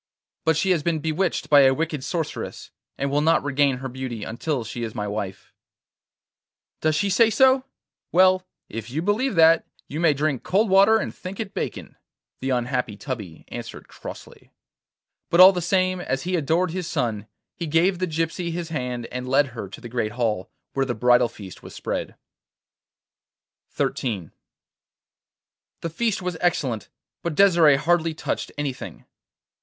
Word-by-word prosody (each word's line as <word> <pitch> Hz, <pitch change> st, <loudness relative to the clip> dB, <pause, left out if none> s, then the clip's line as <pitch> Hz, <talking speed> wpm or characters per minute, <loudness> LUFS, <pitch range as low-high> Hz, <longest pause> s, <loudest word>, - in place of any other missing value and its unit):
'But 160 Hz, -2 st, +3 dB
she 190 Hz, +3 st, +2 dB
has 170 Hz, -4 st, +2 dB
been 165 Hz, +1 st, 0 dB
bewitched 160 Hz, +4 st, -1 dB
by 145 Hz, -2 st, +7 dB
a 135 Hz, -1 st, +5 dB
wicked 155 Hz, -3 st, -2 dB
sorceress, 165 Hz, 0 st, -4 dB, 0.3 s
and 140 Hz, 0 st, -1 dB
will 145 Hz, +1 st, +2 dB
not 165 Hz, +2 st, +3 dB
regain 140 Hz, -1 st, +2 dB
her 135 Hz, +1 st, -5 dB
beauty 125 Hz, -4 st, -5 dB
until 120 Hz, +4 st, -2 dB
she 120 Hz, +2 st, -6 dB
is 115 Hz, -2 st, -4 dB
my 105 Hz, -1 st, -2 dB
wife.' 100 Hz, -2 st, -5 dB, 1.3 s
'Does 155 Hz, -1 st, +1 dB
she 200 Hz, +6 st, +1 dB
say 220 Hz, +4 st, +4 dB
so? 260 Hz, +3 st, +4 dB, 0.5 s
Well, 185 Hz, +1 st, +5 dB, 0.2 s
if 115 Hz, +1 st, -7 dB
you 150 Hz, +6 st, -2 dB
believe 210 Hz, +4 st, +1 dB
that, 165 Hz, 0 st, +5 dB, 0.2 s
you 150 Hz, -, -5 dB
may 165 Hz, -4 st, +4 dB
drink 140 Hz, -3 st, 0 dB
cold 205 Hz, +2 st, +1 dB
water 200 Hz, +3 st, +6 dB
and -, -, -3 dB
think 185 Hz, +1 st, -8 dB
it 210 Hz, -3 st, -4 dB
bacon,' -, -, -5 dB, 0.4 s
the 135 Hz, -, -3 dB
unhappy 125 Hz, -3 st, -1 dB
Tubby 105 Hz, -, -6 dB
answered -, -, -8 dB
crossly. -, -, -11 dB, 0.8 s
But 170 Hz, -, +2 dB
all 185 Hz, +1 st, +11 dB
the 180 Hz, -2 st, -3 dB
same, 185 Hz, +1 st, +1 dB
as 135 Hz, -5 st, -2 dB
he 180 Hz, +1 st, -1 dB
adored 165 Hz, +3 st, +1 dB
his 180 Hz, -1 st, -4 dB
son, 110 Hz, -8 st, -2 dB, 0.3 s
he 170 Hz, -, -4 dB
gave 170 Hz, +4 st, +2 dB
the 185 Hz, -, 0 dB
gypsy 165 Hz, +2 st, -2 dB
his 170 Hz, 0 st, -4 dB
hand 125 Hz, -6 st, -3 dB
and 125 Hz, 0 st, -5 dB
led 140 Hz, +1 st, +3 dB
her 115 Hz, -6 st, -7 dB
to -, -, -10 dB
the 120 Hz, -, -9 dB
great 115 Hz, -3 st, -2 dB
hall, 110 Hz, -6 st, -1 dB, 0.2 s
where 135 Hz, -, +1 dB
the 120 Hz, -, -2 dB
bridal 120 Hz, +1 st, +4 dB
feast 100 Hz, -5 st, -11 dB
was -, -, -11 dB
spread. -, -, -4 dB, 1.6 s
XIII 100 Hz, -, -2 dB, 1.5 s
The 165 Hz, -, -4 dB
feast 215 Hz, +1 st, -1 dB
was 180 Hz, -2 st, -3 dB
excellent, 130 Hz, -, 0 dB, 0.3 s
but 170 Hz, -3 st, -3 dB
Desire 170 Hz, -7 st, +6 dB
hardly 165 Hz, +1 st, +1 dB
touched -, -, -3 dB
anything. 145 Hz, -3 st, -5 dB
155 Hz, 165 wpm, -24 LUFS, 125-180 Hz, 1.6 s, all